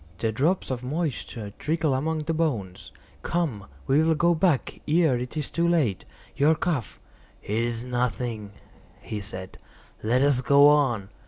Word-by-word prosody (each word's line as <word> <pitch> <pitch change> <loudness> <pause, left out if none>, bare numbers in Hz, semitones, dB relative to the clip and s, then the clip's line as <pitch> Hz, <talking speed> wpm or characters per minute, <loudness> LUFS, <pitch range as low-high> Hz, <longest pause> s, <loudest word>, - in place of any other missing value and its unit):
The 110 +3 -1
drops 150 - 0
of 125 -2 -3
moisture 125 - -4
trickle 155 -2 0
among 155 +4 -1
the 165 +2 -1
bones. 120 - -2 0.3
Come, 150 - -2 0.2
we 140 +3 +3
will 160 0 +3
go 170 +2 +3
back 160 -4 0
ere 155 -3 +3
it 125 +5 -6
is 150 - -3
too 170 0 +1
late. 150 - +1 0.3
Your 150 +4 +4
cough—" 155 - -2 0.4
"It 110 +3 -1
is 120 -1 -2
nothing," 120 -4 -2 0.5
he 105 -1 -6
said; 95 -2 -7 0.4
"let 125 +5 +2
us 140 -3 +3
go 140 +2 +6
on. 120 -9 +2
135 Hz, 155 wpm, -25 LUFS, 115-160 Hz, 0.5 s, go